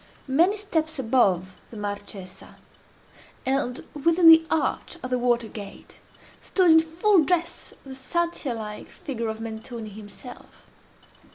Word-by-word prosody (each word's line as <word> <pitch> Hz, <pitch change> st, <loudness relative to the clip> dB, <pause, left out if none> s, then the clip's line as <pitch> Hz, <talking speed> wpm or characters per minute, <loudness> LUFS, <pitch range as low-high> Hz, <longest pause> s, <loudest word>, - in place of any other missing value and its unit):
Many 340 Hz, +10 st, +3 dB
steps 320 Hz, -7 st, -2 dB
above 200 Hz, -8 st, +1 dB
the 225 Hz, -, -11 dB
Marchesa, 205 Hz, -2 st, -7 dB, 0.9 s
and 265 Hz, -1 st, -1 dB
within 330 Hz, +3 st, +5 dB
the 325 Hz, 0 st, +8 dB
arch 320 Hz, +2 st, -1 dB
of 255 Hz, -, -5 dB
the 250 Hz, -, +1 dB
water 240 Hz, -2 st, +1 dB
gate, 205 Hz, -2 st, -11 dB, 0.4 s
stood, 365 Hz, -3 st, +3 dB
in 320 Hz, -, +8 dB
full 330 Hz, +3 st, +3 dB
dress, 345 Hz, +2 st, -2 dB
the 270 Hz, -, -8 dB
Satyr 310 Hz, -1 st, -2 dB
like 210 Hz, -1 st, -7 dB
figure 235 Hz, -5 st, -5 dB
of 220 Hz, 0 st, -5 dB
Mentoni 225 Hz, 0 st, -7 dB
himself. 210 Hz, +4 st, -12 dB
260 Hz, 125 wpm, -25 LUFS, 220-325 Hz, 0.9 s, the